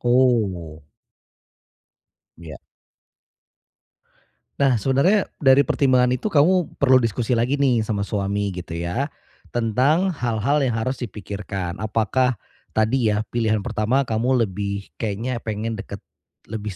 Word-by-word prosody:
Oh. 110 -11 +1 1.6
Ya. 80 -4 -9 2.0
Nah, 135 -3 +4
sebenarnya 140 - +2
dari 135 0 +5
pertimbangan 130 -3 +3
itu 170 +12 -1
kamu 175 +1 +2
perlu 130 -2 +5
diskusi 115 +1 -1
lagi 120 +4 +1
nih 130 -5 +2
sama 105 -2 -2
suami, 100 -1 -2
gitu 85 -2 -6
ya, 90 - -2 0.4
tentang 135 - +1
hal-hal 125 +2 0
yang 125 -4 0
harus 130 +4 -2
dipikirkan. 100 -4 -5
Apakah 110 +4 +1 0.4
tadi 110 +2 +2
ya 105 +1 0
pilihan 110 -3 0
pertama 125 +6 0
kamu 120 +2 +1
lebih 100 0 -5
kayaknya 115 +3 -2
pingin 110 +1 -3
dekat - - -8 0.5
lebih 105 -1 -4
115 Hz, 115 wpm, -22 LUFS, 105-130 Hz, 2.0 s, dari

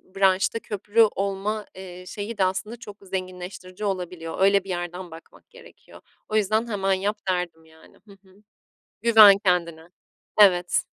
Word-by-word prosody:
branşta 195 +3 +2
köprü 210 +1 0
olma, 200 +2 -3
eee, 180 -1 -10
şeyi 210 +3 -6
de 195 - +2
aslında 190 +5 -2
çok 205 -3 -11
zenginleştirici 185 +1 -7
olabiliyor. 180 -4 -4
Öyle 195 0 +4
bir 195 - -13
yerden 175 0 -5
bakmak 165 +1 -15
gerekiyor. - - -17 0.3
O 215 - -3
yüzden 215 +2 +1
"hemen 195 -3 0
yap" 200 +3 -1
derdim, 175 -3 -3
yani. 160 0 -21
Hı - - -15
hı. 190 -1 -21 0.7
Güven 215 -3 +8
kendine. 170 -4 -1 0.5
Evet. 180 -3 +4
190 Hz, 140 wpm, -24 LUFS, 180-205 Hz, 0.7 s, Güven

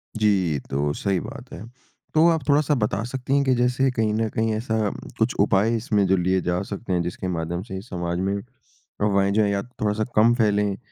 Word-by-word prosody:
जी, 95 -9 +2
तो 70 +2 0
सही 95 -2 -1
बात - - -9
है। 90 - -8 0.5
तो 160 +2 +5
आप 160 -5 0
थोड़ा-सा 145 0 +3
बता 105 -3 -1
सकती 130 +2 -2
हैं 140 - +3
कि 130 - +3
जैसे 125 +2 +2
कहीं 110 -3 0
न 110 0 0
कहीं 110 0 +1
ऐसा 110 -2 -1 0.3
कुछ - - +1
उपाय 105 +4 +3
इसमें 105 -3 +1
जो 95 0 +3
लिए 95 +1 +1
जा 90 +1 -1
सकते 100 -1 -3
हैं, 90 - +1
जिसके 90 +2 -4
माध्यम 85 0 -2
से 95 -3 -6
समाज 85 -4 -4
में, 100 +1 0
अफवाहें 100 -4 -3
जो 110 - +3
हैं 100 - +1
या 100 0 0
थोड़ा-सा 110 -3 -2
कम 115 +2 +5
फैलें, 105 -3 +1
105 Hz, 205 wpm, -23 LUFS, 95-115 Hz, 0.5 s, तो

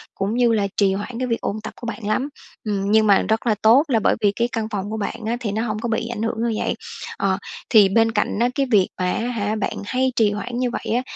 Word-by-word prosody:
cũng 195 +2 -1
như 240 -1 +4
là 205 -2 +1
trì 195 -2 +3
hoãn 220 +5 -5
cái 255 - -1
việc 230 -1 -1
ôn 215 +1 -3
tập 220 - -6
của 240 - -5
bạn 230 -2 -5
lắm. 260 +7 0 0.3
Ừm, 200 -2 -1
nhưng 220 0 +5
mà 200 -1 +5
rất 220 +2 -1
là 215 - +3
tốt 235 +6 +6
là 240 -6 +2
bởi - - +2
vì 205 -2 +4
cái 235 +3 0
căn 225 -3 -2
phòng 200 -1 -3
của 220 - -3
bạn 220 +2 -4
á 230 +2 -1
thì 225 -5 -3
nó 215 +2 -1
hông 215 -1 -2
có 235 - -3
bị 225 0 -1
ảnh 235 -2 -4
hưởng 225 0 -1
như 220 - -2
vậy. - - 0 0.4
Ờ, 190 -1 +1 0.3
thì 210 -3 +6
bên 225 +3 +3
cạnh 210 -1 -1
á 240 +1 +3
cái 275 - +1
việc 195 -4 +5
mà 180 0 +1
á - - -1
hả 215 -3 -1
bạn 215 - -2
hay 260 +4 0
trì 215 -3 +3
hoãn 240 +4 -4
như 250 -1 +1
vậy 225 - -2
á, 245 - +2
220 Hz, 285 wpm, -22 LUFS, 205-235 Hz, 0.4 s, tốt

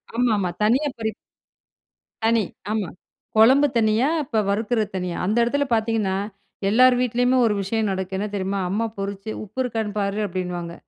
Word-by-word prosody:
ஆமா, 245 0 +2
ஆமா. 185 -3 0
தனியா 250 +8 +3
பொறிப் 220 -1 -2 1.1
தனி 230 0 +4 0.3
ஆமா, 210 -5 -1 0.5
கொழம்பு 260 +7 +6
தனியா, 220 +3 +3 0.2
இப்ப 230 -5 -1
வறுக்கிற 220 +3 0
தனியா, 180 -2 -3
அந்த 210 +5 0
இடத்துல 285 +4 +1
பாத்தீங்கன்னா, 220 -3 0 0.5
எல்லார் 250 +4 +6
வீட்லயுமே 245 +1 +2
ஒரு 220 - +2
விஷயம் 220 +3 -1
நடக்கு 190 0 -3
என்ன 200 - -2
தெரியுமா? 195 0 -2
அம்மா, 210 +5 0
பொறிச்சு 200 +1 -5
"உப்பு 215 +5 -9
இருக்கான்னு 225 -4 -3
பாரு” 200 +1 -1
அப்டின்னுவாங்க. 180 -2 -4
220 Hz, 150 wpm, -23 LUFS, 195-235 Hz, 1.1 s, கொழம்பு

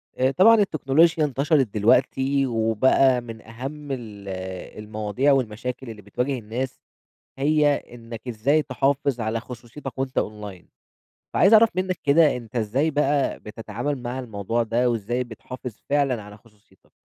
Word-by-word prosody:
آآ 130 +1 +2
طبعًا 195 +10 +6
التكنولوجيا 160 -4 +3
انتشرِت 140 0 +2
دلوقتي 130 +5 +2
وبقى 125 +2 +3
من 115 -2 -9
أهم 135 +6 -7
ال 110 -6 -7 0.6
المواضيع 110 +6 0
والمشاكل 125 0 -2
اللي 105 -2 -9
بتواجه 125 +6 -2
الناس 120 +4 -5 0.6
هي 150 +1 +3
إنك 115 0 -10
إزاي 130 +7 +2
تحافظ 135 -1 0
على 115 0 -1
خصوصيتك 125 +2 -9
وأنت 130 0 -2
أونلاين. 105 -4 -5 0.7
فعايز 195 +5 +5
أعرف 225 +1 +8
منك 185 -1 -1
كده 150 0 +5
أنت 120 0 -9
إزاي 120 +8 +1
بقى 145 -1 +1
بتتعامل 115 +5 -5
مع 120 +2 -4
الموضوع 115 -1 -2
ده؟ 120 +2 +1
وإزاي 120 +2 -1
بتحافظ 120 0 -9
فعلًا 140 -5 +1
على 105 0 -12
خصوصيتك. 105 -3 -26
125 Hz, 135 wpm, -24 LUFS, 110-140 Hz, 0.7 s, أعرف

